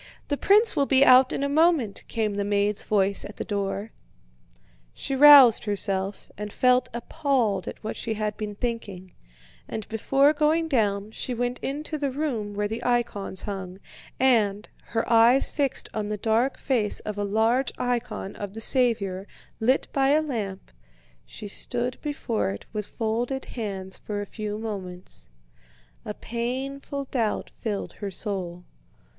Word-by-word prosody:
The 290 - +1
prince 420 +9 +4
will 280 - +2
be 270 0 +5
out 255 +1 +7
in - - -2
a - - +1
moment," 300 - +2
came 220 -3 -1
the 200 0 -1
maid's 205 0 +1
voice 200 -1 +1
at - - -9
the - - -4
door. 200 +1 -3 1.0
She 270 - -3
roused 275 -6 +9
herself, 195 -1 -2
and 210 0 -5
felt 250 +2 +3
appalled 235 - -1
at - - -7
what 215 - -4
she 225 -2 -3
had 210 -1 -2
been 210 -1 -5
thinking, 200 -6 -5 0.5
and 220 - -5
before 270 +6 +3
going 310 +2 +2
down 210 -7 0
she 245 +2 -4
went 245 +1 -2
into 300 +3 -4
the 280 -1 0
room 255 -8 -3
where 205 0 0
the 225 +3 -5
icons 235 -6 -1
hung 190 -3 -5 0.4
and, 215 -6 +2 0.2
her 225 - -2
eyes 235 +3 +5
fixed 280 -3 -1
on 215 -1 -2
the 210 0 -3
dark 225 +5 +1
face 230 -7 0
of 210 -1 -5
a - - 0
large 225 +6 +1
icon 245 -5 -3
of 205 0 -6
the - - -5
Saviour 210 -6 +1 0.3
lit 255 +5 +2
by 270 -1 +2
a 300 +2 +4
lamp, 210 - -5 0.6
she 210 - -8
stood 245 +4 -3
before 285 - -2
it 100 +1 -6
with 210 -1 -3
folded 240 +4 -2
hands 195 -5 -5
for 205 -1 -4
a 205 - -3
few 210 0 -5
moments. 190 -5 -7 0.8
A 210 - -5
painful 265 +4 -4
doubt 235 -5 -2
filled 210 -4 -4
her 205 - -5
soul. 180 -3 -4
225 Hz, 155 wpm, -25 LUFS, 205-260 Hz, 1.0 s, roused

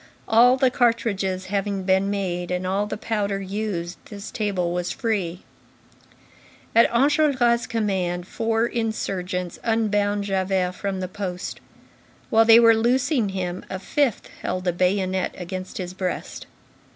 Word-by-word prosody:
All 245 +3 +6
the 260 -1 +3
cartridges 200 -6 0
having 200 -1 -1
been 190 +1 +2
made, 180 -3 -2
and 180 0 -2
all 195 +3 0
the - - -4
powder 205 -3 -1
used, 195 -3 -4
this 205 0 -8
table 185 -5 -1
was 180 0 -2
free. 190 -7 -2 1.3
At 230 - +6
Enjolras' 255 -2 +3
command, 190 -6 -1
four 225 +1 0
insurgents 190 -6 -3
unbound 205 -3 +1
Javert 190 -2 0
from 195 0 -3
the 185 - -2
post. 185 -1 -5 0.7
While 225 0 +5
they 225 0 +8
were 230 -1 +7
loosing 240 +1 +2
him, 185 -2 -4
a 190 - -3
fifth 255 +5 -1
held 185 0 -3
a 175 - +2
bayonet 185 +1 0
against 185 +1 -6
his 180 -1 -5
breast. 185 -1 -4
200 Hz, 135 wpm, -23 LUFS, 185-225 Hz, 1.3 s, they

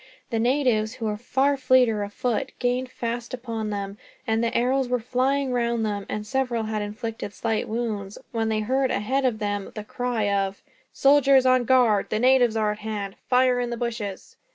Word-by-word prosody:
The 225 - 0
natives, 235 -3 +1
who 225 - -6
were 210 -1 -1
far 265 +5 +1
fleeter 255 -5 +3
of 205 0 -4
foot, 250 +3 -2
gained 250 +1 -1
fast 235 0 -4
upon 230 -3 -4
them; 200 0 -4 0.3
and 225 -1 +1
the 230 - +1
arrows 255 +2 +1
were 250 - +2
flying 260 +3 0
round 235 -2 0
them, 205 -2 -3
and 210 0 -3
several 250 -1 -1
had 215 -1 -2
inflicted 215 0 -5
slight 220 -1 -1
wounds, 215 -4 -3
when 225 -1 -1
they 215 -1 0
heard 260 +4 +1
ahead 260 +5 0
of 245 -4 +1
them 205 -2 -3
the 215 - -5
cry 245 0 -2
of: 195 -1 -1 0.3
"Soldiers 275 -1 +5
on 255 -1 +4
guard. 235 -5 +3
The 215 - 0
natives 250 -1 +4
are 215 -1 +1
at 210 - -6
hand. 210 -2 -4 0.2
Fire 250 0 +4
in 245 -1 -1
the 235 - -3
bushes." 225 -5 -5
235 Hz, 190 wpm, -25 LUFS, 215-255 Hz, 0.3 s, Soldiers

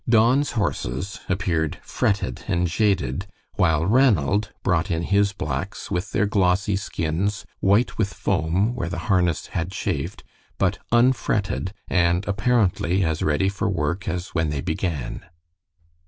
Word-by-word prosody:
Don's 120 +5 +4
horses 100 - -2
appeared 90 -5 0
fretted 95 - -1
and 85 +1 +1
jaded, 95 - 0 0.3
while 80 -4 +2
Ranald 105 - +3
brought 90 +1 +1
in 85 -1 0
his 100 +2 +2
blacks 100 0 -4
with 90 +1 -2
their 105 - +2
glossy 100 0 +2
skins 95 +1 -2
white 105 +5 +2
with 100 -3 +1
foam 90 +6 0
where 90 -9 -3
the 85 - -4
harness 90 -4 +2
had 85 +2 -1
chafed, - - -3 0.3
but - - +1
unfretted, 115 -6 +2 0.2
and 90 +1 +2
apparently 100 -3 +2
as 80 -2 -1
ready 75 +5 +2
for 100 +1 -1
work 85 +1 -2
as 90 +1 -3
when 80 -2 0
they 75 -2 -2
began. 75 -8 -3
95 Hz, 135 wpm, -23 LUFS, 85-105 Hz, 0.3 s, Don's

